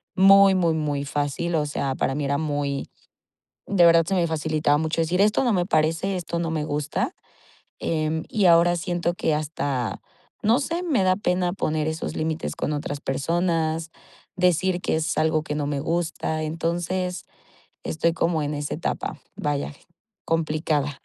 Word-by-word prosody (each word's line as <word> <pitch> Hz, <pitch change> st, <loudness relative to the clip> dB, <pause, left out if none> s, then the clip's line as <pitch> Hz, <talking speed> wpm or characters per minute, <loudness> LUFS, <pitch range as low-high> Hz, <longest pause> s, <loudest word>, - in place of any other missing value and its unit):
muy, 195 Hz, +1 st, +7 dB
muy, 170 Hz, -3 st, +2 dB
muy 145 Hz, -2 st, -1 dB
fácil. 145 Hz, +4 st, -2 dB
O 150 Hz, -, +1 dB
sea, 140 Hz, -2 st, -2 dB
para 135 Hz, -, 0 dB
mí 145 Hz, 0 st, -2 dB
era 140 Hz, +1 st, +1 dB
muy 145 Hz, -2 st, -2 dB, 0.8 s
de 180 Hz, -4 st, +4 dB
verdad 165 Hz, 0 st, +6 dB
se 195 Hz, -, -2 dB
me 175 Hz, -2 st, +2 dB
facilitaba 155 Hz, -2 st, +1 dB
mucho 160 Hz, +2 st, -1 dB
decir: 175 Hz, +4 st, +1 dB
"Esto 210 Hz, +5 st, +3 dB
no 240 Hz, -, +3 dB
me 180 Hz, -2 st, +1 dB
parece, 165 Hz, +3 st, +1 dB
esto 170 Hz, -1 st, -4 dB
no 165 Hz, -1 st, -2 dB
me 155 Hz, -2 st, -1 dB
gusta", 150 Hz, -, -2 dB, 0.7 s
em, 160 Hz, 0 st, -1 dB
y 210 Hz, -3 st, 0 dB
ahora 175 Hz, 0 st, +5 dB
siento 175 Hz, 0 st, -1 dB
que 160 Hz, -, 0 dB
hasta, 145 Hz, -5 st, -2 dB, 0.4 s
no 230 Hz, +6 st, +3 dB
sé, 335 Hz, +5 st, -2 dB
me 280 Hz, -, +1 dB
da 185 Hz, 0 st, +3 dB
pena 180 Hz, -3 st, 0 dB
poner 155 Hz, -4 st, -1 dB
esos 160 Hz, +1 st, -4 dB
límites 160 Hz, +1 st, -2 dB
con -, -, -2 dB
otras 145 Hz, 0 st, -4 dB
personas, 165 Hz, +3 st, -1 dB, 0.5 s
decir 180 Hz, 0 st, +2 dB
que -, -, 0 dB
es 160 Hz, 0 st, -1 dB
algo 155 Hz, 0 st, +2 dB
que 150 Hz, -, -4 dB
no 145 Hz, -1 st, -1 dB
me 145 Hz, -1 st, -2 dB
gusta. 160 Hz, -1 st, -2 dB
Entonces, 175 Hz, +3 st, -2 dB, 0.6 s
estoy 165 Hz, +1 st, +1 dB
como 165 Hz, -2 st, 0 dB
en 145 Hz, -, -2 dB
esa 145 Hz, 0 st, -3 dB
etapa, -, -, -3 dB, 0.2 s
vaya, 145 Hz, 0 st, -2 dB, 0.5 s
complicada. 155 Hz, -3 st, 0 dB
160 Hz, 165 wpm, -24 LUFS, 150-175 Hz, 0.8 s, muy